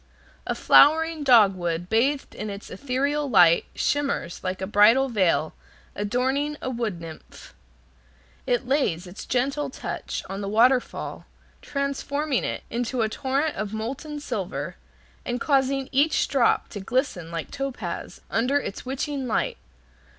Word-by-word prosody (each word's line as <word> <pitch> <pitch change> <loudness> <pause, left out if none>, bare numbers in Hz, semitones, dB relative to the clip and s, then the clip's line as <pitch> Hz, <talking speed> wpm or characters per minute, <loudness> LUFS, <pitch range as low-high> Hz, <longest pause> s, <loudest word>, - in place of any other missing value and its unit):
A - - -1
flowering 320 +1 +5
dogwood 185 -9 +4
bathed 265 +7 +1
in 215 - -5
its 200 0 -8
ethereal 280 +7 -1
light 175 -7 +6
shimmers 280 -12 -1
like 185 0 -3
a 190 - -2
bridal 220 +7 +5
veil 185 -8 +1 0.4
adorning 265 +8 -1
a 255 - -3
wood 230 -7 -3
nymph. 165 -2 -11 0.9
It 245 +1 +1
lays 230 - +1
its 180 +3 -9
gentle 275 +3 0
touch - - -5
on 195 +1 -5
the 200 - -3
waterfall, 245 +4 +1 0.3
transforming 280 0 -2
it - - -3
into 240 +1 -1
a 220 - 0
torrent 275 +6 -1
of 210 0 -3
molten 275 +7 -5
silver, 180 - -4 0.5
and 245 0 -2
causing 270 0 +1
each 290 +4 +2
drop 265 -4 +2
to 205 - -6
glisten 195 - -1
like 165 -1 -5
topaz 250 -11 -5
under 255 +5 +2
its 205 - -6
witching 270 +1 -3
light. 485 - -1
250 Hz, 135 wpm, -25 LUFS, 200-280 Hz, 0.9 s, light